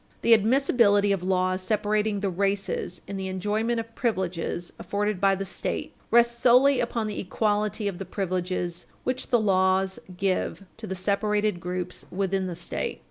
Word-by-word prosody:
The 230 - +6
admissibility 220 -3 +4
of 195 -3 0
laws 185 0 +1
separating 210 0 0
the 200 - 0
races 195 -2 -1
in 200 - -5
the 190 0 -3
enjoyment 210 +5 -1
of 230 0 -7
privileges 185 -6 -2
afforded 205 +1 -2
by 195 -1 +4
the 195 +1 -4
State 190 - -3 0.2
rests 235 0 +4
wholly 255 +2 +6
upon 235 -1 -1
the 210 -1 -4
equality 210 +2 0
of 195 -3 -4
the 195 - -5
privileges 180 -2 -3 0.2
which 255 +1 -2
the 240 - +4
laws 190 -2 +2 0.2
give 195 +1 -1
to 220 -1 -7
the 190 - -3
separated 210 +1 0
groups 180 0 -4
within 190 0 -1
the 175 - -4
State. - - -4
200 Hz, 160 wpm, -26 LUFS, 185-215 Hz, 0.2 s, The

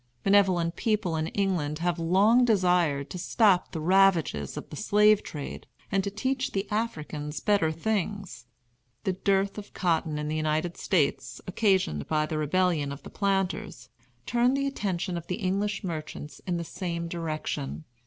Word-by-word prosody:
Benevolent 185 -4 +3
people 210 -6 0
in 160 0 -1
England 175 -7 -1
have 170 +1 -1
long 200 +9 +4
desired 180 - +2
to 180 - -5
stop 190 0 +3
the 165 - -4
ravages 175 - +3
of - - -6
the - - -6
slave 210 +3 +4
trade 145 -2 -7 0.2
and 195 0 +2
to 200 - -1
teach 260 +6 -2
the 195 +1 -1
Africans 155 -9 -3
better 200 -7 +2
things. 200 - -3 0.6
The 190 - 0
dearth 195 +2 +1
of 205 - -12
cotton 165 -4 0
in 150 0 -3
the 155 - -2
United 155 +2 0
States, 140 - 0
occasioned 185 - +1
by 155 -1 +1
the 155 0 -3
Rebellion 155 -2 +1
of 140 - -8
the - - -10
planters, 195 -2 -1 0.4
turned 245 +3 +2
the 275 - 0
attention 190 -9 -2
of 170 - -6
English 200 +2 -1
merchants 155 -4 -6
in 175 -1 0
the 170 - -3
same 170 -1 -4
direction. 155 -3 -4
180 Hz, 155 wpm, -27 LUFS, 155-200 Hz, 0.6 s, long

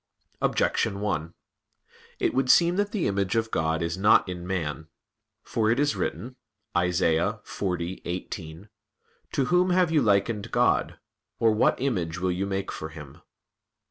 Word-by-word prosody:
Objection 100 - +1
1: 85 -6 -2 0.8
It - - 0
would 130 -1 0
seem 175 +4 +5
that 205 0 0
the 200 -6 -1
image 100 0 0
of 115 0 0
God 80 +1 0
is 85 +2 -3
not 105 0 +5
in 90 -1 -6
man. 80 -5 -3 0.6
For 110 -1 0
it 120 +4 +2
is 145 0 +2
written 125 +2 -4 0.4
(Isa. 90 +3 +1
40:18): 90 -1 -5 0.6
"To 135 - +1
whom 180 +5 +3
have 180 -2 +3
you 155 -3 +3
likened 105 -1 +1
God? - - +1 0.4
or 115 -1 +3
what 110 - +2
image 90 -12 -1
will 90 0 0
you 95 +2 -2
make 95 0 -3
for 80 - -6
Him?" 75 -4 -12
100 Hz, 145 wpm, -26 LUFS, 85-115 Hz, 0.8 s, seem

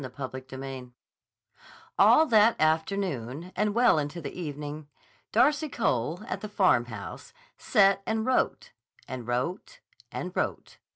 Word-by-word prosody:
CHAPTER 130 -1 -5
XVII 130 -2 -7 1.1
ALL 315 - +7
that 225 -4 +4
afternoon 160 - -1
and 210 +1 0
well 240 -9 +5
into 145 +3 -4
the 155 - -6
evening, 150 -2 -6 0.4
Darcy 295 +6 +3
Cole, 160 - -1
at - - -5
the 215 - -6
Farmhouse, 120 - 0 0.2
sat 195 -1 +3
and 220 0 0
wrote 485 - 0 0.4
and 125 -3 -6
wrote 170 - -3 0.3
and - - -5
wrote. - - -3
165 Hz, 120 wpm, -28 LUFS, 130-215 Hz, 1.1 s, ALL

